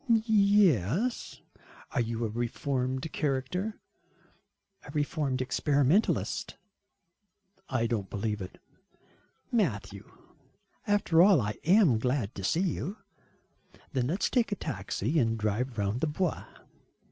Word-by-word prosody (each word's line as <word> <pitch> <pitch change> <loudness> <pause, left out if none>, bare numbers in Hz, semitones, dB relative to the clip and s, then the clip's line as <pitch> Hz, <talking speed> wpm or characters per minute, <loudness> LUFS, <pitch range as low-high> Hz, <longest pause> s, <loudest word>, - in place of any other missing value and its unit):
"Yes." 200 - +2 0.5
"Are 125 - +1
you 115 0 -2
a - - -2
reformed 130 +4 -2
character?" 155 +10 -2 1.0
"A - - -12
reformed 145 -3 -1
experimentalist." 145 - +1 1.1
"I 130 -4 0
don't 110 -5 -2
believe 105 0 -3
it." 90 - -8 0.9
"Matthew, 105 - -1 0.8
after 205 -5 +3
all 190 -3 +6
I 105 -2 -3
am 175 - +5
glad 125 -3 -1
to 100 - -7
see 160 - +1
you." 190 - -2 1.0
"Then 125 -3 0
let 180 +8 -2
us - - +1
take 240 -4 +1
a - - +1
taxi 130 - -2
and 115 -3 +1
drive 110 +3 -2
round 105 +4 -1
the 160 - +1
Bois." 165 +3 -2
135 Hz, 115 wpm, -29 LUFS, 115-180 Hz, 1.1 s, all